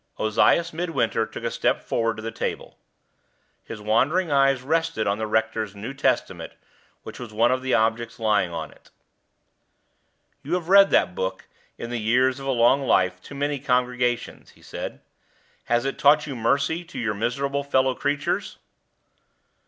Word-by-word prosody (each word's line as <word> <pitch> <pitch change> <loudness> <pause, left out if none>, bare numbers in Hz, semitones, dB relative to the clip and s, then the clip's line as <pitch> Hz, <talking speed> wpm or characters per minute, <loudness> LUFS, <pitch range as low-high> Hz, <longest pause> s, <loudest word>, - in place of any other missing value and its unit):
Ozias 115 +10 +2
Midwinter 165 0 -1
took - - -9
a - - -1
step - - 0
forward 115 -1 -1
to 110 - -9
the 115 - -4
table. - - -5 0.8
His 115 - -8
wandering 140 - +1
eyes 135 -2 +3
rested 160 -5 0
on 100 +1 0
the 110 - -2
rector's 110 -1 -1
New 110 +7 -6
Testament, 120 - -1 0.5
which - - -9
was 120 -3 -8
one 115 +3 +2
of 130 0 0
the 130 0 +1
objects 115 +1 0
lying 105 -5 +1
on 80 -2 -5
it. - - -22 1.5
"You 150 +5 -2
have 175 -1 -4
read 195 0 +7
that 90 - +2
Book, 95 +1 -4 0.3
in 120 - -6
the 120 - -2
years 125 +4 +2
of 135 - -7
a - - +2
long 120 +2 +4
life, 95 -7 +1
to 140 - -11
many 145 0 -1
congregations," 125 -2 -1
he - - -22
said. - - -7 0.6
"Has 120 +2 +1
it 135 - -3
taught 150 +1 +5
you 140 -3 -6
mercy 140 +8 0
to 175 - -12
your 115 -3 -1
miserable 140 +6 -2
fellow 130 -2 +2
creatures?" 145 +2 -2
125 Hz, 165 wpm, -24 LUFS, 110-140 Hz, 1.5 s, read